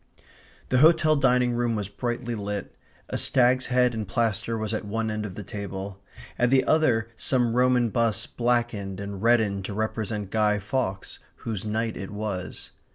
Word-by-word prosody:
The 130 - +3
hotel 155 0 +5
dining 125 -3 +3
room 120 -1 0
was 105 -3 -2
brightly 120 +3 -3
lit. 100 -2 -4 0.3
A - - -2
stag's 125 0 +3
head 125 -1 +3
in 110 -2 -3
plaster 115 +2 -1
was 110 0 -3
at 110 - -2
one 110 +2 -2
end 105 0 -3
of 90 - -10
the 105 - -6
table; 100 0 -6 0.4
at 125 - +3
the 130 0 +4
other 120 -8 +2
some 120 -3 +1
Roman 125 -1 +3
bust 115 -1 0
blackened 120 -5 0
and 100 -1 -6
reddened 110 -4 +2
to 100 - -5
represent 110 -2 -3
Guy 105 -1 +2
Fawkes, 100 -2 -3 0.2
whose 110 -3 -4
night 110 +1 -1
it 95 - -6
was. 105 -3 -5
110 Hz, 165 wpm, -26 LUFS, 100-120 Hz, 0.4 s, hotel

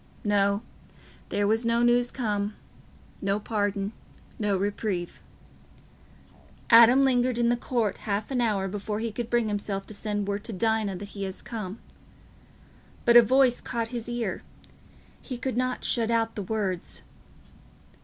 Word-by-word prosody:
No; 200 0 +2 0.7
there 205 - 0
was 220 +3 +2
no 230 +1 +2
news 240 0 +3
come—no 205 -3 -4
pardon—no 205 -1 -3
reprieve. 200 -2 -3 1.5
Adam 235 +4 +8
lingered 250 -2 +2
in 235 -1 +3
the 240 - +3
court 235 -4 -1
half 210 +3 -3
an 250 -2 +1
hour 205 -5 +1
before 205 +2 -4
he 230 0 -2
could 235 +2 -4
bring 240 -2 +2
himself 200 -1 -3
to - - -9
send 205 -1 -3
word 205 0 -2
to 230 - -3
Dinah 220 -1 0
that 200 +2 -7
he 200 -1 -6
was 190 - -8
come. 215 -3 -5 1.3
But 235 - +5
a 240 - +12
voice 255 +1 +3
caught 230 -1 -3
his 240 -1 -5
ear: 235 -4 -2 0.8
he 255 - -6
could 255 0 -3
not 255 0 -1
shut 230 -2 +1
out 225 -1 +1
the 205 - -4
words. 195 -3 -3
220 Hz, 145 wpm, -27 LUFS, 205-240 Hz, 1.5 s, a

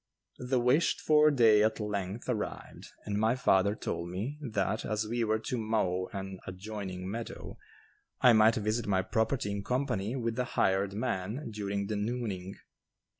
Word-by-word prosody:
The 125 0 0
wished 125 +7 +3
for 155 0 +5
day 115 -7 +5
at 110 +1 +2
length 105 0 -3
arrived 120 -5 -4 0.2
and 105 0 -1
my 110 +3 +3
father 100 -4 +3
told 85 -5 -4
me 110 +12 -4
that 110 -5 -1
as 110 0 -1
we 120 +1 -1
were 110 0 +2
to 120 +2 -3
mow 100 -5 0
an 95 -1 -6
adjoining 95 -1 -6
meadow, 115 +4 -6 0.6
I 125 - +7
might 110 +1 +6
visit 110 +2 -1
my 95 -2 +2
property 110 0 0
in 100 0 -3
company 125 -3 -1
with 115 -2 -2
the 125 - 0
hired 95 +1 +2
man 115 +3 -3
during 100 -1 -2
the 105 +1 -2
"nooning." 105 -4 -3
110 Hz, 160 wpm, -30 LUFS, 100-120 Hz, 0.6 s, I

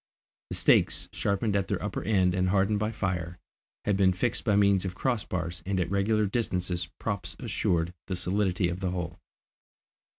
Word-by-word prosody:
The - - -3
stakes, - - +3
sharpened 100 +1 0
at 100 -1 +1
their - - -1
upper - - -3
end 95 -4 +3
and 90 0 +1
hardened 100 +2 +2
by 105 +1 0
fire, 90 -4 -3 0.5
had 105 - +2
been 95 -2 +4
fixed 115 +6 -1
by 105 -4 +2
means 100 -2 +4
of 95 -1 -4
cross 120 -3 0
bars, 85 -2 -4
and 95 +2 -1
at 90 0 -1
regular 105 +2 +2
distances 90 -5 -1
props 100 -6 -3
assured 85 0 0
the 95 - -2
solidity 90 0 +1
of 85 +1 -3
the 95 -1 -1
whole. 85 -2 -4
95 Hz, 175 wpm, -28 LUFS, 90-100 Hz, 0.5 s, been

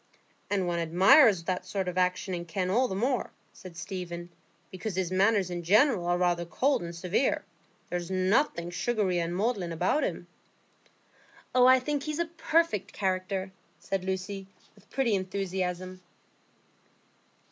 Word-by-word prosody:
"And 195 -2 0
one 175 -1 -1
admires 190 - +5
that 180 +1 -2
sort 195 -2 -3
of 180 - -3
action 185 +1 0
in 175 -1 -4
Kenn 180 +2 -2
all 250 +5 +3
the 190 - -4
more," 250 +5 0 0.2
said 180 -3 -12
Stephen, 175 -1 -6 0.4
"because 185 +1 -5
his 185 -2 -1
manners 195 0 +2
in 175 0 -3
general 205 - +3
are 175 0 +2
rather 175 -1 +1
cold 265 +10 +1
and 170 0 -6
severe. 180 +9 0 0.5
There's 175 0 -3
nothing 185 - +1
sugary 190 -2 0
and 170 +1 -2
maudlin 195 -4 -1
about 180 - +1
him." - - -3 1.3
"Oh, 250 0 +6
I 260 0 +7
think 290 +2 -2
he's 305 +1 -4
a 340 - 0
perfect 330 - 0
character!" 190 0 -2 0.3
said 195 -1 -3
Lucy, 190 +1 -4 0.3
with 205 -1 -24
pretty 255 -5 0
enthusiasm. 185 -1 -3
185 Hz, 145 wpm, -28 LUFS, 175-215 Hz, 1.3 s, I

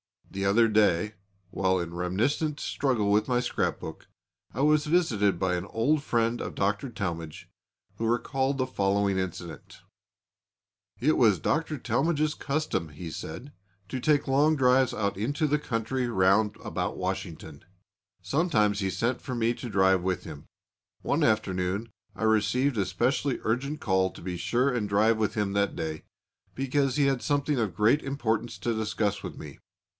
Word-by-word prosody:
The 95 0 -3
other 115 +4 +4
day, 105 -2 +2 0.4
while 95 0 +1
in 85 -1 -4
reminiscent 120 - -1
struggle 120 -7 0
with 105 +1 +3
my 125 -1 +2
scrapbook, 125 - -3 0.4
I 125 - -3
was 150 +1 +3
visited 115 - +2
by 95 0 0
an 90 +1 -3
old 130 +9 +1
friend 115 -3 0
of - - -5
Dr. 105 +6 0
Talmage, 85 -7 -5 0.5
who 115 - -1
recalled 135 +3 0
the 130 - +1
following 100 -4 +1
incident: 90 -4 -6 1.2
"It 150 +6 +2
was 110 -6 +5
Dr. 155 - -1
Talmage's 150 +6 0
custom," 145 - -2
he 80 +3 -8
said, 120 - -7 0.4
"to 130 - -3
take 145 +2 +2
long 145 +4 +3
drives 130 -2 +3
out 100 -2 -1
into 140 +9 -1
the 150 0 +1
country 125 0 -2
round 100 0 +3
about - - -3
Washington. 90 -5 -5 0.6
Sometimes 105 - +1
he 95 -2 0
sent 120 +6 -1
for 130 - -5
me 115 0 +1
to 120 - -7
drive 95 -2 +3
with 95 0 -1
him. 75 -3 -9 0.6
One - - 0
afternoon 100 0 0 0.2
I - - -5
received 110 +5 +2
a 100 - +1
specially 130 +4 0
urgent 140 +7 -1
call 95 -3 +1
to - - -13
be 90 0 -4
sure 125 +9 +1
and 115 -4 -1
drive 110 +3 +3
with 110 0 -1
him 105 -2 0
that 100 0 +1
day, 80 -1 -4 0.5
because 135 0 0
he 145 - +3
had 135 -3 +1
something 145 -1 0
of 105 -7 -1
great 110 +9 +3
importance 120 -4 -2
to 120 - -1
discuss 110 -2 -1
with - - -7
me. 75 -3 -10
110 Hz, 160 wpm, -27 LUFS, 95-135 Hz, 1.2 s, was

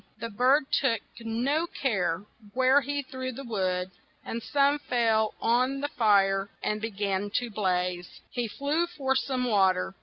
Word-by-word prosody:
The 230 +1 -5
bird 255 +8 +4
took 230 -5 +2 0.2
no 250 +9 0
care 190 - -1 0.3
where 260 +2 +5
he 285 +1 -2
threw 260 -1 -5
the 270 +3 -8
wood, 185 -5 -1 0.3
and 230 - -4
some 285 +3 +2
fell 225 -5 +1
on 255 +4 +2
the 290 +1 -2
fire 200 -4 +3
and 210 0 -1
be 225 - -2
gan 200 -1 -2
to 245 -2 0
blaze. 180 -3 -1
He 240 -2 -2
flew 290 +9 -1
for 270 -6 -1
some 260 -1 0
wa 195 -5 +4
ter. 185 +1 -4
230 Hz, 160 wpm, -28 LUFS, 200-270 Hz, 0.3 s, where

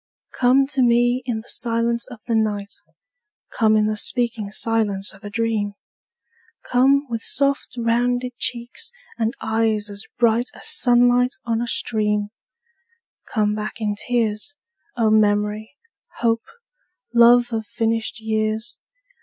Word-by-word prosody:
Come 260 +2 +4
to 270 -2 0
me 240 +1 +3
in 225 -3 -2
the 225 - -20
silence 235 0 -1
of 245 -5 -12
the 235 - -2
night; 205 -2 -1 0.8
Come 215 -2 +3
in 215 - +3
the 215 0 0
speaking 225 -1 0
silence 205 -2 0
of 195 +3 -18
a 205 - -6
dream; 215 -1 -1 0.9
Come 275 +3 +3
with 230 -2 -4
soft 280 +1 -1
rounded 245 +1 0
cheeks 245 - -3 0.3
and 225 +3 0
eyes 220 -1 0
as 200 0 -6
bright 235 +1 +2
As - - -4
sunlight 245 +1 +3
on 230 -1 0
a 240 - -2
stream; 210 -3 0 1.0
Come 210 -2 +1
back 215 +1 -5
in 210 -2 -1
tears, 230 +3 -2 0.4
O 225 -2 +2
memory, 210 +2 +1 0.4
hope, 230 -1 0 0.7
love 240 0 +5
of 220 -1 -3
finished 225 -1 -1
years. 220 +1 -2
225 Hz, 130 wpm, -21 LUFS, 215-245 Hz, 1.0 s, love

